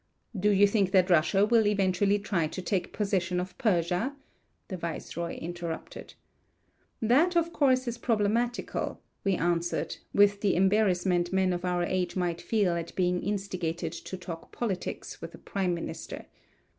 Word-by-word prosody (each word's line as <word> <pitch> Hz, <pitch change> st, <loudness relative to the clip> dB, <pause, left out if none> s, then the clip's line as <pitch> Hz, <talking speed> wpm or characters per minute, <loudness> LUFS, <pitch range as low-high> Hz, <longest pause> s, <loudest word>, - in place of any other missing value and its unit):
"Do 205 Hz, +2 st, +2 dB
you 205 Hz, 0 st, +6 dB
think 200 Hz, -2 st, +2 dB
that 185 Hz, -1 st, +4 dB
Russia 180 Hz, +5 st, +4 dB
will 225 Hz, -1 st, +4 dB
eventually 200 Hz, 0 st, +2 dB
try 195 Hz, -6 st, 0 dB
to 170 Hz, -, -7 dB
take 185 Hz, -3 st, -1 dB
possession 185 Hz, -4 st, 0 dB
of 180 Hz, 0 st, -5 dB
Persia?" 180 Hz, +5 st, +1 dB, 0.5 s
the 190 Hz, -, -4 dB
viceroy 170 Hz, 0 st, -4 dB
interrupted. 170 Hz, -1 st, -6 dB, 0.8 s
"That, 285 Hz, +11 st, +3 dB
of 335 Hz, 0 st, +1 dB
course, 255 Hz, -3 st, +3 dB
is 240 Hz, 0 st, -3 dB
problematical," 230 Hz, +2 st, 0 dB, 0.2 s
we 195 Hz, -1 st, +2 dB
answered, 170 Hz, 0 st, -1 dB
with 200 Hz, 0 st, +4 dB
the 200 Hz, -, +2 dB
embarrassment 185 Hz, -2 st, +2 dB
men 190 Hz, -1 st, +2 dB
of 175 Hz, 0 st, -4 dB
our 180 Hz, -1 st, 0 dB
age 180 Hz, 0 st, -1 dB
might 175 Hz, -2 st, -1 dB
feel 205 Hz, -6 st, +1 dB
at 170 Hz, -1 st, -4 dB
being 180 Hz, -1 st, +1 dB
instigated 180 Hz, -5 st, -2 dB
to 185 Hz, +2 st, -7 dB
talk 170 Hz, -3 st, -8 dB
politics 205 Hz, -7 st, -4 dB
with -, -, -7 dB
a -, -, -12 dB
prime 185 Hz, -3 st, -1 dB
minister. 170 Hz, -, -6 dB
190 Hz, 150 wpm, -29 LUFS, 175-210 Hz, 0.8 s, you